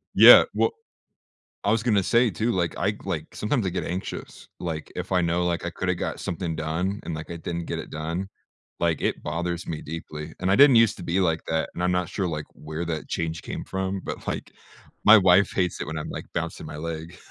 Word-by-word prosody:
Yeah, - - +11
well - - +2 0.9
I 100 - +2
was 115 +1 +2
gonna 105 -5 +3
say, 115 +4 +3
too, 110 +7 0
like, 85 -3 -1
I, 100 +3 0
like 80 -5 -4
sometimes 110 0 0
I - - +2
get 90 - -3
anxious, 90 +2 -6
like, 80 -3 -4
if - - -4
I 90 - +4
know, 85 +1 +1
like, 85 0 -1
I - - -2
could've 90 +1 -2
got - - -3
something 85 -1 -3
done 80 +6 -2
and, 85 - -4
like, 80 +1 -7
I 85 - -4
didn't 85 0 -4
get - - -3
it - - -10
done, 85 +5 -3 0.5
like, 85 -4 +1
it - - -1
bothers 85 +3 -3
me 80 -2 -4
deeply. 75 0 -7
And 95 +1 +1
I 100 - +4
didn't 140 -3 +8
used 115 -2 +5
to - - -7
be 90 +3 0
like 80 -3 +2
that, 80 0 0
and 85 - -3
I'm 90 0 +2
not 90 -1 0
sure, 95 -2 -2
like, 75 -2 -3
where 80 +2 -5
that 80 -2 -4
change 80 -1 -3
came - - -5
from, 95 0 -3
but, - - -6
like, - - -4 0.5
my 110 +1 +10
wife 95 0 +5
hates 90 -2 0
it - - -3
when 80 +2 -4
I'm, 75 - -5
like, - - -6
bouncing - - -4
my 75 0 -7
leg. 80 +2 -6
85 Hz, 230 wpm, -25 LUFS, 80-95 Hz, 0.9 s, Yeah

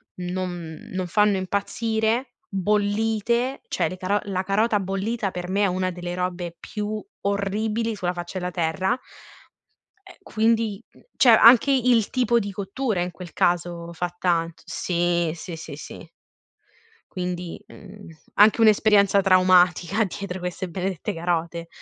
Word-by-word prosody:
non 180 -3 -5
non 185 -1 -3
fanno 210 +2 +3
impazzire 220 +5 -1 0.3
bollite, 215 +5 0
cioè - - 0
le - - -5
caro 195 +3 0
la 190 -2 -2
carota 210 +3 +1
bollita 195 +2 -2
per 180 0 -5
me 200 +2 0
è - - +4
una 185 0 -1
delle 175 0 -5
robe 180 -1 -3
più 210 0 -4 0.2
orribili 210 +3 -1
sulla 180 -3 -2
faccia 175 +1 -5
della 180 0 -3
terra. 185 +8 0 1.1
Ehm, - - -14
quindi, 220 -1 0
mhmm, - - -21 0.2
cioè 255 - +5
anche 245 +4 +7
il 245 -4 +3
tipo 240 -2 +2
di 200 -2 -4
cottura 200 +1 -2
in 180 0 -2
quel 175 0 -11
caso 175 -1 0
fa 175 +1 -3
tant 170 -2 0
sì, 175 0 0
sì, 170 0 -7
sì, 160 -2 -8
sì. 150 +2 -10 1.0
Quindi, 180 -1 -5
mhmm, 205 +1 -13 0.3
anche 215 +2 +5
un'esperienza 210 -2 +5
traumatica 185 +1 +4
dietro 190 0 -6
queste 180 +1 -4
benedette 190 +2 -3
carote. 170 -1 -2
190 Hz, 140 wpm, -24 LUFS, 175-215 Hz, 1.1 s, anche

